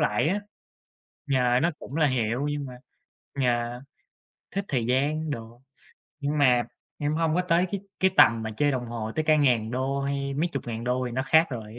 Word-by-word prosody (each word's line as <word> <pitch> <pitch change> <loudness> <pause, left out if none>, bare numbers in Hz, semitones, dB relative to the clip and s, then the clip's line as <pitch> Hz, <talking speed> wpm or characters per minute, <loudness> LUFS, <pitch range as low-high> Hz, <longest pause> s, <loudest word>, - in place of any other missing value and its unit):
lại 115 +8 +2
á. 205 +3 0 0.9
Yeah, 125 0 +3
nó 170 +2 +2
cũng 140 - -9
là 155 -3 +3
hiệu 125 +2 0
nhưng 145 -1 -3
mà 125 - -8 0.7
yeah, 120 0 0 0.7
thích 200 0 -1
thời 120 -5 0
gian 150 +5 0
đồ, 115 -1 -7 0.6
nhưng 145 +1 -1
mà 125 -4 +4 0.4
em 145 +1 -1
hông 160 -1 +1
có 180 - +2
tới 180 +1 +2
cái 200 -2 -3 0.2
cái 190 0 +4
tầm 115 -6 +6
mà 110 - -3
chơi 145 +2 +2
đồng 125 -2 -2
hồ 115 -2 -5
tới 155 - +2
cả 155 0 +4
ngàn 120 -6 +2
đô 135 +2 -1
hay 140 0 -2
mấy 165 +5 0
chục 140 - -3
ngàn 115 0 -4
đô 125 +1 0
thì 120 - -5
nó 130 - -1
khác 160 +3 +4
rồi. 115 -2 -7
130 Hz, 205 wpm, -26 LUFS, 120-150 Hz, 0.9 s, tầm